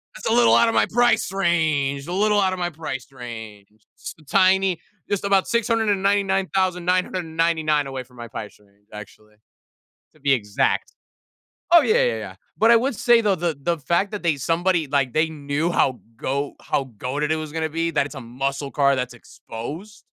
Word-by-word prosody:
that's -, -, -6 dB
a 225 Hz, -, +2 dB
little 240 Hz, 0 st, +5 dB
out 235 Hz, -, +5 dB
of 230 Hz, -, 0 dB
my -, -, +3 dB
price 240 Hz, -3 st, +2 dB
range. 155 Hz, -7 st, 0 dB
A -, -, -5 dB
little 210 Hz, +2 st, +2 dB
out 190 Hz, -1 st, +2 dB
of 185 Hz, -, -5 dB
my 175 Hz, 0 st, -1 dB
price 145 Hz, -5 st, -6 dB
range. 110 Hz, -5 st, -9 dB, 0.3 s
S -, -, -8 dB
a -, -, -18 dB
tiny 190 Hz, +2 st, +3 dB, 0.3 s
just 200 Hz, -1 st, -1 dB
about 195 Hz, -1 st, +2 dB
699,999 185 Hz, -, +1 dB
away 130 Hz, -1 st, -5 dB
from 125 Hz, 0 st, -22 dB
my 120 Hz, 0 st, -7 dB
price 110 Hz, -2 st, -8 dB
range, 100 Hz, 0 st, -29 dB
actually, 105 Hz, 0 st, -12 dB, 0.8 s
to 155 Hz, -, -24 dB
be 140 Hz, -1 st, +2 dB
exact." 105 Hz, -4 st, 0 dB, 0.8 s
Oh, 340 Hz, -3 st, +8 dB
yeah, 470 Hz, +8 st, +3 dB
yeah, -, -, 0 dB
yeah. -, -, -9 dB, 0.2 s
But 225 Hz, +2 st, +5 dB
I -, -, +7 dB
would 245 Hz, 0 st, 0 dB
say, 240 Hz, -1 st, +4 dB
though, 205 Hz, -3 st, +2 dB
the 165 Hz, -3 st, -2 dB
the 170 Hz, +4 st, 0 dB
fact 170 Hz, +8 st, 0 dB
that 205 Hz, -, -5 dB
they 155 Hz, -4 st, +2 dB
somebody 165 Hz, +3 st, 0 dB
like, 135 Hz, -3 st, 0 dB
they 155 Hz, +1 st, +2 dB
knew 150 Hz, +2 st, -2 dB
how 130 Hz, -6 st, +1 dB, 0.2 s
goa 140 Hz, +4 st, -2 dB
how 135 Hz, -, -1 dB
goated 145 Hz, +4 st, -2 dB
it 160 Hz, -, +2 dB
was 155 Hz, -1 st, -6 dB
gonna 160 Hz, 0 st, -2 dB
be, 165 Hz, +2 st, -1 dB
that 140 Hz, -, +1 dB
it's 145 Hz, -, -10 dB
a 135 Hz, -, -6 dB
muscle 135 Hz, +4 st, -4 dB
car 140 Hz, -1 st, +3 dB
that's 125 Hz, -1 st, -3 dB
exposed, 145 Hz, -, -9 dB
160 Hz, 190 wpm, -22 LUFS, 135-195 Hz, 0.8 s, Oh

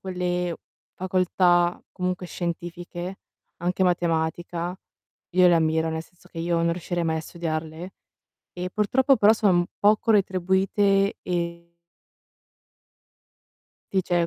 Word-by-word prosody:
quelle 180 Hz, -2 st, -2 dB, 0.4 s
facoltà 180 Hz, -1 st, +2 dB
comunque 180 Hz, -1 st, -2 dB
scientifiche, 175 Hz, +1 st, -5 dB, 0.4 s
anche 180 Hz, +2 st, -1 dB
matematica, 175 Hz, 0 st, -1 dB, 0.6 s
io 180 Hz, -1 st, +6 dB
le 175 Hz, -, +5 dB
ammiro, 160 Hz, 0 st, +2 dB
nel 160 Hz, 0 st, -3 dB
senso 180 Hz, +2 st, -22 dB
che 165 Hz, -, -10 dB
io 170 Hz, 0 st, 0 dB
non 170 Hz, 0 st, +2 dB
riuscirei 175 Hz, 0 st, -3 dB
mai 160 Hz, 0 st, 0 dB
a -, -, -3 dB
studiarle. 160 Hz, +1 st, -5 dB, 0.6 s
E 180 Hz, +1 st, -4 dB
purtroppo 260 Hz, +7 st, +3 dB
però 215 Hz, +1 st, +6 dB
sono 205 Hz, -4 st, +3 dB
m -, -, -2 dB
poco 215 Hz, +2 st, +3 dB
retribuite 195 Hz, +1 st, +2 dB
e 170 Hz, -1 st, -3 dB, 2.2 s
e 190 Hz, -, +2 dB
cioè 175 Hz, -1 st, +1 dB
175 Hz, 120 wpm, -25 LUFS, 170-185 Hz, 2.2 s, io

